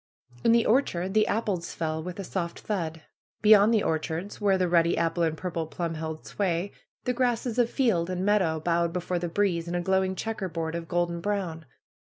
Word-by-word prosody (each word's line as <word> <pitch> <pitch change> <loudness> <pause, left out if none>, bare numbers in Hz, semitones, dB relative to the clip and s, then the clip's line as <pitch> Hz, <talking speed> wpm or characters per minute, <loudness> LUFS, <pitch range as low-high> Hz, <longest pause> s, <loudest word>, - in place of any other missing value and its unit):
In - - +5
the 230 0 +4
orchard 190 -7 +1
the 215 0 +4
apples 200 -6 -2
fell 160 -1 -2
with 180 +3 -7
a - - -3
soft 175 -2 -4
thud. 165 -6 -3 0.4
Be 210 - +6
yond 210 +1 +8
the 220 -3 +3
orchards, 160 +5 -2
where 195 -2 +3
the 185 -1 +1
ruddy 170 -1 +3
apple 170 +1 0
and 160 -1 +1
purple 170 -3 -3
plum 170 0 -3
held 160 0 -5
sway, 185 -1 -1 0.3
the 250 - 0
grasses 245 -1 0
of 235 -1 +3
field 210 -12 +1
and 185 +1 -2
meadow 185 -6 +2
bowed 170 +1 +1
before 180 0 -2
the 175 0 -3
breeze 175 -2 0
in 175 - -3
a 175 - 0
glowing 190 +1 +1
checkerboard 185 -7 -3
of 170 0 -4
golden 175 0 -1
brown. 175 -6 -3
175 Hz, 200 wpm, -27 LUFS, 165-205 Hz, 0.4 s, yond